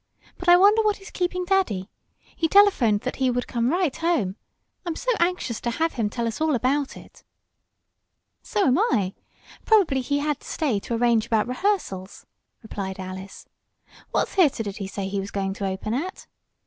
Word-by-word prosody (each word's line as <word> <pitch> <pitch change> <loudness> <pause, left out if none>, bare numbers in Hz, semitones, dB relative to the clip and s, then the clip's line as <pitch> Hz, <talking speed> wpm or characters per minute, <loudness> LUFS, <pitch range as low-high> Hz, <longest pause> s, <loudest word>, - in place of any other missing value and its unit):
"But 355 - 0
I 350 - +9
wonder 410 +4 +6
what 420 -1 +1
is 390 - -12
keeping 360 0 -2
daddy? 350 - 0 0.4
He 325 - +1
telephoned 310 - +4
that 255 - -4
he 260 -1 +2
would 245 0 -1
come 235 0 0
right 345 -3 +1
home. 310 - 0 0.5
I'm 340 -3 -3
so - - -1
anxious 340 -10 0
to 240 - -1
have 320 +8 0
him 225 -4 -1
tell 235 +2 -3
us 225 +6 -4
all 315 -3 +2
about 265 +3 0
it!" - - -15 1.2
"So 405 - 0
am 265 +6 +3
I. 205 - +1 0.5
Probably 370 - +3
he 285 +3 -1
had 295 0 -1
to - - -15
stay 265 -10 0
to 235 - -4
arrange 235 -2 +2
about 220 -1 +1
rehearsals," 250 - -2 0.4
replied 195 -3 -5
Alice. 190 +1 -8 0.6
"What - - +1
theater 300 - +2
did 200 -2 -6
he 195 -3 -4
say 195 0 -4
he 195 +1 -2
was 195 +1 -5
going 195 -1 -2
to 195 0 -3
open 190 +3 -3
at?" 335 +10 -4
255 Hz, 185 wpm, -24 LUFS, -, 1.2 s, I